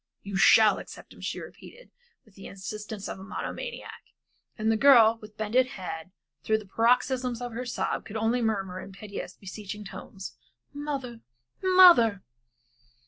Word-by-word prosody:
"You 200 -1 -6
shall 215 +2 +6
accept - - -12
him," - - -16
she - - -4
repeated - - -13 0.3
with 215 - -23
the 195 - -11
insistence 210 +1 -7
of - - -6
a - - -10
monomaniac. 485 - -6 0.6
And 220 0 +1
the - - +2
girl, 230 -3 +6
with 215 0 -13
bended 230 +4 +2
head, 175 -2 -6 0.3
through 220 - +2
the 215 - -9
paroxysms 245 +3 +1
of 245 -1 -5
her 245 +2 -5
sobs, 245 - -3
could 220 - -5
only 225 +3 +1
murmur 195 -5 -2
in 195 - -11
piteous, 200 0 -8
beseeching 210 +1 -8
tones, 195 -4 -9 0.4
"Mother! 275 -5 -5 0.4
mother!" 350 - +6
220 Hz, 150 wpm, -27 LUFS, 200-250 Hz, 0.6 s, shall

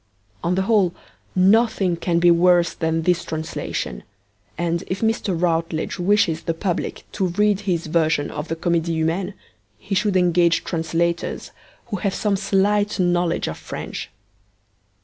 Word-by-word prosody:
On 175 +2 +1
the 190 - +1
whole, 195 -4 +2 0.4
nothing 195 -1 +3
can 170 0 -1
be 175 0 +5
worse 175 0 +4
than 160 0 -1
this 175 0 +2
translation, 160 - -4 0.6
and 170 0 -1
if 185 - -3
Mr. 220 -5 0
Routledge 165 0 -1
wishes 185 -3 +2
the 165 - -2
public 180 +1 -3
to 190 -3 0
read 205 +3 +2
his 180 -5 -1
version 155 -2 +1
of 150 +2 -5
the 165 - -2
Comedie 170 0 0
Humaine, 170 +5 -1 0.4
he 110 - -6
should 200 -1 +2
engage 175 -1 +3
translators 170 0 -2 0.4
who 205 - -1
have 195 0 -1
some 210 -2 +1
slight 205 +1 +1
knowledge 175 -1 +1
of 80 - -5
French. - - -6
175 Hz, 145 wpm, -22 LUFS, 165-195 Hz, 0.6 s, be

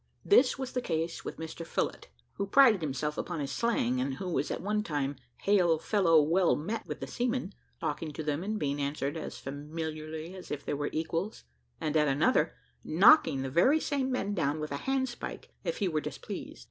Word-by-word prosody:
This 285 -11 +5
was 265 -1 -4
the 250 - -1
case 165 -4 -2
with - - -6
Mr 160 +1 -6
Phillott, - - -2 0.3
who 200 - -1
prided 235 -4 +6
himself 150 +1 -2
upon 175 -3 -3
his 140 -2 -3
slang, 130 - +1
and 135 +1 -1
who 185 +6 -4
was 150 - 0
at - - -2
one 210 +2 0
time 145 -7 -2 0.3
"hail 180 -5 +4
fellow, 165 -2 +4
well 170 +4 +3
met" 215 +9 -4
with - - -5
the - - -2
seamen, 245 -4 -2 0.3
talking 155 0 -3
to 155 - -5
them, 150 +2 -1
and 215 +2 -2
being 145 -5 -1
answered 140 +1 -2
as 160 - -5
familiarly 155 +3 -5
as 185 -1 -10
if 145 -1 -5
they - - -1
were 145 0 -1
equals, 165 +6 -2 0.4
and 155 0 -2
at 150 -1 +4
another, 140 +2 +2 0.3
knocking 165 - +6
the 135 - -4
very 260 - +5
same 275 -4 -1
men 205 -5 -1
down 155 -5 0
with 150 -1 -4
a 140 - -1
handspike 260 -2 -2
if - - -2
he 200 - +1
were 155 -3 0
displeased. - - -7
165 Hz, 200 wpm, -30 LUFS, 150-205 Hz, 0.4 s, prided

